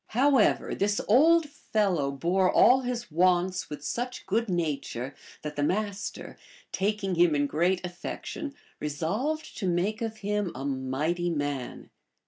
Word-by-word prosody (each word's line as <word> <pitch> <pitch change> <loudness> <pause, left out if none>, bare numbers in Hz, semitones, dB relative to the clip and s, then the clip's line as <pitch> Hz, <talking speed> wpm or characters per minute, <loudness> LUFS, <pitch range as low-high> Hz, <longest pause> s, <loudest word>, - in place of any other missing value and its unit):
However, 270 -3 +3
this 205 +1 +1
old 315 +8 +5
fellow 205 - 0
bore 175 +7 +1
all 255 +1 +6
his 245 -5 -4
wants 180 +2 +2
with 150 0 -7
such 245 +9 -3
good 225 +3 0
nature 145 -6 -2 0.3
that 150 - -5
the 145 - -2
Master, 205 +5 -2 0.3
taking 195 0 -1
him 170 -2 +4
in 145 0 +2
great 175 +5 +1
affection, 275 - -6 0.2
resolved 200 - -2
to 195 - -1
make 190 +6 0
of 225 -1 -3
him 205 -3 0
a 135 +2 -5
mighty 140 +6 -1
man. 145 -5 -3
185 Hz, 135 wpm, -28 LUFS, 150-220 Hz, 0.3 s, all